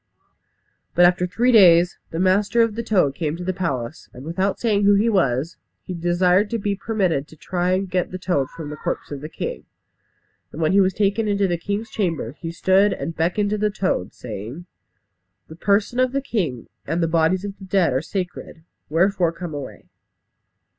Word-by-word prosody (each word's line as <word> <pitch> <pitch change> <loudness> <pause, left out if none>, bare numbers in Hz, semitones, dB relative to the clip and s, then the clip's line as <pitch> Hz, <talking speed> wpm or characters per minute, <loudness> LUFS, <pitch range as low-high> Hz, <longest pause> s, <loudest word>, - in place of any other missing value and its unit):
But 175 - +6
after 180 0 +3
three 235 +7 +2
days, 175 -5 +6
the 165 - -5
master 200 +5 +3
of 230 -2 0
the 230 - -3
toad 190 -11 +2
came 155 +1 -3
to 180 - -6
the 185 +1 -1
palace, 145 -8 -4
and 130 +3 -10
without 190 +4 -1
saying 210 -4 +1
who 205 0 +5
he 215 +4 +3
was, 160 - 0 0.3
he 185 - -6
desired 180 +3 +2
to 235 - -1
be 205 -1 -1
permitted 190 -9 -1
to 160 - -15
try 180 +3 -1
and 190 +1 0
get 180 0 -1
the 185 - -5
toad 175 -8 -1
from 155 -3 -8
the - - -5
corpse - - -4
of 140 -2 -5
the 155 - -7
king. - - -5 0.9
And 155 - -9
when 155 -1 +2
he 200 +1 +5
was 190 -1 +1
taken 205 +2 +1
into 200 -1 +1
the 175 - 0
king's 205 +6 -4
chamber, 165 - -2
he 165 -1 -5
stood 190 +4 +3
and 165 - -5
beckoned 180 +6 0
to 210 - -1
the 210 0 +2
toad, 190 - -1
saying, 115 - -7 0.8
"The 160 - -10
person 205 +7 +1
of 255 0 +2
the 275 - 0
king 160 - -2 0.2
and 170 +1 0
the - - +2
bodies 165 +4 +1
of 200 -1 -7
the 195 - -10
dead 185 -7 +2
are 130 - +1
sacred, 175 -1 -6 0.3
wherefore 175 +2 +2
come 170 -1 -7
away." 145 -2 -8
180 Hz, 200 wpm, -22 LUFS, 165-200 Hz, 0.9 s, But